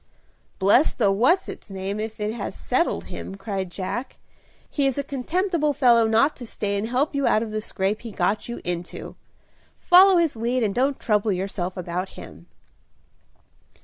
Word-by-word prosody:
"Bless 205 +10 +4
the 205 -5 +3
what's 255 - +3
its - - -9
name 195 +1 -4
if 220 0 -5
it 210 +1 -2
has 225 -4 -5
settled 260 +7 0
him," 190 - -7
cried 195 -2 -4
Jack. 190 +8 -5 0.5
"He 280 -2 0
is 270 - -1
a 280 - 0
contemptible 305 +3 -1
fellow 240 -5 +4
not 225 +7 +3
to 245 - -8
stay 200 -2 -2
and 200 +2 -2
help 260 +6 0
you 280 -1 +1
out 215 - +3
of 220 - -6
the 215 0 -2
scrape 205 0 -2
he 235 - -7
got 205 +3 -1
you 235 - -5
into. 175 0 -5 0.6
Follow 370 +1 +7
his 330 -5 +2
lead 240 +2 0
and 205 -2 0
don't 265 +4 +1
trouble 210 -1 +1
yourself 185 -1 -3
about 180 +1 -4
him." 85 +3 -11
220 Hz, 175 wpm, -24 LUFS, 195-270 Hz, 0.6 s, Follow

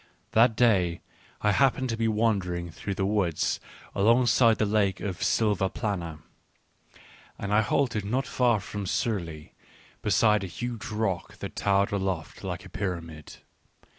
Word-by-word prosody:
That 115 0 +5
day 95 -8 +3 0.4
I 105 - +3
happened 130 +2 +2
to 115 - 0
be 115 0 0
wandering 95 -6 0
through 95 +5 -5
the 95 - 0
woods 95 -6 0 0.3
alongside 115 +2 +4
of - - -4
the 110 - +1
Lake 100 -2 +1
of 95 -2 -4
Silvaplana, 95 -5 0 1.1
and 100 0 -3
I 105 - +5
halted 110 -1 0
not 125 +7 -1
far 120 -4 +2
from 100 +1 -6
Surlei, 85 -9 -2 0.5
beside 105 -3 +3
a - - -3
huge 120 +5 -5
rock 105 -5 -2
that - - -7
towered 100 0 +2
aloft 95 -5 -3
like - - -5
a - - -11
pyramid. 85 -5 -6
100 Hz, 140 wpm, -27 LUFS, 90-115 Hz, 1.1 s, That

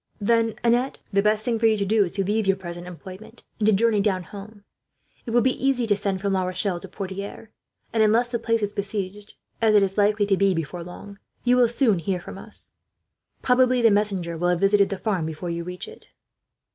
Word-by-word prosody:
"Then, 225 +1 +2
Annette, 240 +3 +1
the 200 - +4
best 215 +1 +1
thing 230 -2 0
for 225 - +4
you 220 -1 +3
to 200 - -1
do 215 +1 +3
is 175 - -4
to 195 - 0
leave 210 +2 0
your 195 - +4
present 175 -1 -8
employment, 190 +6 -11 0.2
and 210 - +1
to - - +6
journey 215 0 +3
down 190 -3 0
home. 205 +2 -11 0.6
It - - -3
will 240 +1 +3
be 260 +1 0
easy 265 -3 +2
to 210 -2 +2
send 195 -2 -2
from 200 -1 0
La 190 - +1
Rochelle 185 0 -2
to 195 - -10
Poitiers, 200 +3 -7 0.4
and 225 - +2
unless 225 +3 +3
the 235 -1 -2
place 230 -1 0
is 205 0 -2
besieged, 200 0 -5 0.3
as 220 -1 +4
it 205 - +6
is 195 +1 -1
likely 205 0 +3
to 200 -1 +2
be 195 -1 +2
before 165 +2 -4
long, 200 +3 -11 0.2
you 245 0 +4
will 245 -2 +4
soon 235 -6 +2
hear 180 +2 -2
from - - -9
us. - - -6 0.7
Probably 255 0 +3
the 225 - +6
messenger 195 -5 0
will 175 - +1
have 175 -1 +1
visited 200 +1 +3
the 195 - -3
farm 185 -6 -1
before 160 +2 -5
you 170 0 -3
reach 180 - -6
it." 450 +1 -14
205 Hz, 225 wpm, -24 LUFS, 190-225 Hz, 0.7 s, to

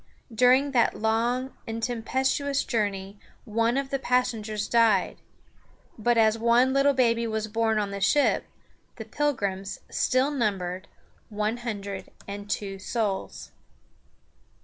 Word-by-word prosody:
During 255 +4 +4
that 240 -3 +2
long 235 +4 0
and 225 0 -4
tempestuous 265 +4 0
journey 200 -3 -2 0.3
one 230 +3 +1
of 275 -1 -2
the 275 - 0
passengers 225 -5 -1
died; 225 -5 +2 0.7
but 235 +2 +1
as 220 0 +4
one 240 +3 +4
little 275 0 +3
baby 235 -2 +2
was 220 -1 -2
born 220 0 0
on 205 -1 -1
the 200 0 -5
ship, 240 +9 +3 0.5
the - - -8
Pilgrims 200 -10 -2
still 260 +3 +1
numbered 190 -8 -2 0.4
one 215 +2 -1
hundred 200 -5 -5 0.2
and 205 +1 -7
two 195 -2 -3
souls. 205 -1 -3
230 Hz, 125 wpm, -26 LUFS, 205-250 Hz, 0.7 s, During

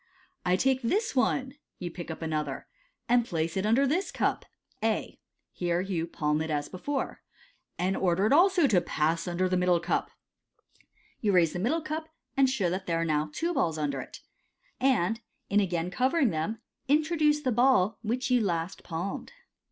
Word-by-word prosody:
" - - -42
I 180 - +4
take 260 +6 +2
this 415 - 0
one" 260 0 +1 0.2
(you 175 -2 -5
pick 170 0 -8
up 160 +1 -6
another), 155 -1 -2 0.2
" - - -46
and 240 0 +4
place 165 -6 -2
it 190 +2 0
under 245 +6 +4
this 335 +8 0
cup - - 0 0.4
,r - - +3
(A) - - -3 0.2
— - - -53
here 175 -1 +1
you 180 -3 -2
palm 150 -2 0
it 160 - -3
as 145 -1 -1
before 270 +9 -4 0.3
— - - -41
"and 185 +2 0
order 185 +1 +2
it 220 - +3
also 355 +1 +5
to 200 -9 +4
pass 160 +1 0
undei 180 +1 0
the 185 0 +1
middle 180 -1 +3
cup." 170 - -1 1.1
You 205 -3 +1
raise 170 -3 +4
the 180 - -3
middle 275 - +1
cup, 315 +1 -4 0.3
and 270 -1 +4
show 225 -9 0
that 190 +1 -3
there 165 -1 +1
are - - 0
now 155 -1 0
two 340 - -1
balls 165 - 0
under 140 -3 -1
it, - - -11 0.6
and, 225 -5 +2 0.3
in 205 - +5
again 175 -3 -1
covering 260 - +2
them, 170 +8 -3 0.3
introduce 300 +1 +3
the 260 -3 0
ball 240 -4 +3
which 250 +4 -2
you 250 -1 +4
last 170 -3 -2
palmed. 175 +3 -4
195 Hz, 190 wpm, -28 LUFS, 170-265 Hz, 1.1 s, also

